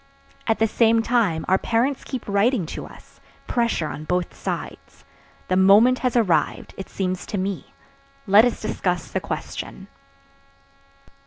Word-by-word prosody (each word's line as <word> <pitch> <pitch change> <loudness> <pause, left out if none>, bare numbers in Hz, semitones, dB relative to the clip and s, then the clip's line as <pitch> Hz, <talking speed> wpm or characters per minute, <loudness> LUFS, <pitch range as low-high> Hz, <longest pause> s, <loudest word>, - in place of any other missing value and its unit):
At 225 - +2
the 225 - +3
same 225 +1 +3
time 225 -10 +1
our 190 +1 +3
parents 250 +4 0
keep 260 -3 -6
writing 200 0 +2
to - - -6
us. - - -17 0.3
Pressure 235 -9 0
on 150 - -6
both 180 +2 -1
sides. - - -6 0.4
The 185 - +1
moment 205 +7 +6
has 250 -2 -1
arrived, 215 -8 +1
it 190 - -8
seems 185 -2 -3
to 205 - -3
me; 195 0 -4 0.5
let 205 +1 +7
us 245 -1 0
discuss 180 -4 -2
the - - 0
question." - - -6
210 Hz, 145 wpm, -23 LUFS, 185-235 Hz, 0.5 s, let